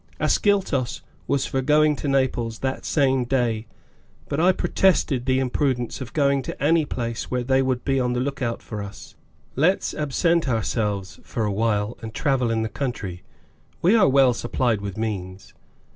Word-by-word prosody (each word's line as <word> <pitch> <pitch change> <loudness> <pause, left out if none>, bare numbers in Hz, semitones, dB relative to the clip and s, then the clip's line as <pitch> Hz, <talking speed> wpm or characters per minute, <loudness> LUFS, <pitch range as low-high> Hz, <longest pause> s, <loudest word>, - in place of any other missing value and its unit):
(Ascyltos 185 - +1 0.3
was 140 -2 +1
for 135 - -1
going 150 +2 +4
to - - -4
Naples 130 -4 0
that 130 - -3
same 135 -4 +2
day, 120 -3 0 0.6
but 140 - -2
I 180 +3 +5
protested 165 -9 +1
the 130 0 +3
imprudence 130 -1 -1
of 125 - -6
going 140 -2 +2
to - - -7
any 155 +3 +3
place 115 -4 -4
where 125 -1 -1
they 130 +1 +2
would 130 -1 -1
be 135 -1 +1
on 125 -1 0
the 125 - -1
lookout 130 -3 -2
for 105 -2 -6
us. 100 0 -9 0.4
"Let's 170 +8 +2
absent 155 +2 +1
ourselves, 105 -4 -2
for 110 - -3
a 105 - -1
while, 105 +1 0
and 110 -1 -8
travel 135 -4 +1
in 110 -1 0
the - - -1
country. 110 -9 -4 0.6
We 185 +7 +5
are 200 -11 +5
well 135 -2 +5
supplied 120 -2 -1
with 100 0 -5
means." 95 -4 -5
130 Hz, 170 wpm, -23 LUFS, 115-140 Hz, 0.6 s, I